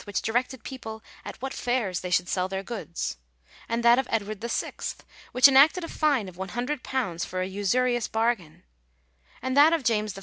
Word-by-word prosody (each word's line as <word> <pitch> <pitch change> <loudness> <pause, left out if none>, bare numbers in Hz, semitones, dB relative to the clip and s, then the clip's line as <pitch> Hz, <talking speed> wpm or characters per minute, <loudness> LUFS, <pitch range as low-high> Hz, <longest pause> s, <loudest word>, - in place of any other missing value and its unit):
which 205 - -1
directed 245 +2 -1
people 225 -4 -8 0.2
at - - -8
what 270 - -3
fairs 230 -8 -1
they 180 - -5
should 180 0 +2
sell 185 0 0
their 190 0 -4
goods; 195 - -5 0.5
and 230 +1 -1
that 235 +1 +6
of 265 - -1
Edward 215 -2 -2
VI., 235 0 -2 0.6
which 250 +2 +8
enacted 280 +6 +5
a - - -4
fine 285 -12 +1
of 180 -1 -11
£100 240 - -3
for 185 - -4
a 185 - 0
usurious 240 +5 0
bargain; 220 -8 -1 0.8
and 260 0 -1
that 300 +3 +7
of 325 -4 0
James 215 -4 0
I. - - -6
230 Hz, 180 wpm, -26 LUFS, 195-260 Hz, 0.8 s, which